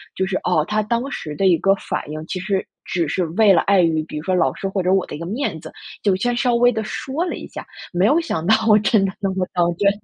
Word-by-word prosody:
就 190 - 0
是， 190 - -2
哦， 155 - +1
她 215 0 0
当 235 +5 -1
时 155 - -6
的 195 - +1
一 175 -3 +4
个 195 - +3
反 - - -4
应， 155 +1 -6
其 185 - -4
实 190 +1 -1 0.2
只 170 -3 -1
是 180 +5 -1
为 215 -3 +6
了 170 - +4
碍 200 -1 +3
于， 160 -2 +1
比 155 - -8
如 150 - -5
说 185 - +1
老 135 -7 +2
师 195 - -4
或 195 -1 -2
者 185 +1 +2
我 195 - +2
的 - - -7
一 - - -8
个 170 - -5
面 220 - -3
子， 160 - -10 0.3
就 200 - +3
先 245 +5 0
稍 240 -1 +1
微 245 +1 +5
地 220 0 -2
说 270 +8 -3
了 355 - -3
一 - - -8
下， - - -9 0.3
没 180 +3 +2
有 295 +8 +4
想 170 - -3
到 205 - +4 0.3
真 200 -1 +3
的 190 - -3
那 195 - 0
么 185 -1 -2
当 175 -1 +1
真， 200 +1 +4
195 Hz, 305 characters per minute, -20 LUFS, 175-220 Hz, 0.3 s, 为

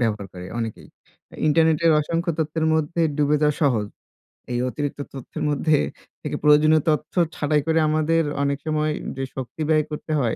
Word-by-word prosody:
ব্যবহার 105 -4 -1
করে 90 0 -8
অনেকেই। 115 -2 -5 0.6
ইন্টারনেটের 160 +1 +4
অসংখ্য 170 +3 -1
তথ্যের 160 0 0
মধ্যে 160 +2 0 0.2
ডুবে 150 0 +3
যাওয়া 150 -1 +2
সহজ। 115 -7 +2 0.7
এই 120 - 0
অতিরিক্ত 145 +1 -4
তথ্যের 135 -3 -6
মধ্যে 150 +1 +2 0.4
থেকে - - -4
প্রয়োজনীয় 150 +1 +5
তথ্য 155 0 -1 0.2
ছাটাই 150 0 +1
করে 160 0 +3
আমাদের 155 +2 +2 0.2
অনেক 140 0 0
সময় 155 0 +1 0.3
যে 135 - -2
শক্তি 130 +4 -6
ব্যয় 155 -1 +4
করতে 150 +1 -6
হয়, 120 -4 0
150 Hz, 155 wpm, -23 LUFS, 140-155 Hz, 0.7 s, প্রয়োজনীয়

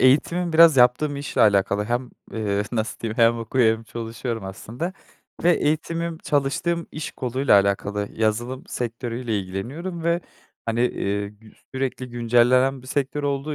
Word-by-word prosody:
eğitimim 170 +7 +3
biraz 160 -2 +7
yaptığım 125 +4 +4
işle 140 0 -3
alakalı 100 0 +3
hem, 120 +2 -2 0.2
eee, 105 -2 -1
nasıl 110 -2 -2
diyeyim 110 -1 -4
hem 115 0 +5
okuyor 115 -1 +2
hem 115 - -12
çalışıyorum 115 -1 -5
aslında. 115 - -5 0.5
Ve 175 - +6
eğitimim 165 +2 -1
çalıştığım 165 +5 0
iş 155 -1 -5
koluyla 130 -4 +3
alakalı, 100 +1 -1
yazılım 120 +4 -1
sektörüyle 120 -1 -3
ilgileniyorum 135 - -5
ve 170 +1 +2 0.5
hani, 115 +1 0
eee, 100 -3 -2
gü 105 +1 -18 0.2
sürekli 130 -1 -3
güncellenen 120 +3 +3
bir - - -14
sektör 140 +2 -1
olduğu 140 +1 -1
125 Hz, 140 wpm, -23 LUFS, 110-145 Hz, 0.5 s, biraz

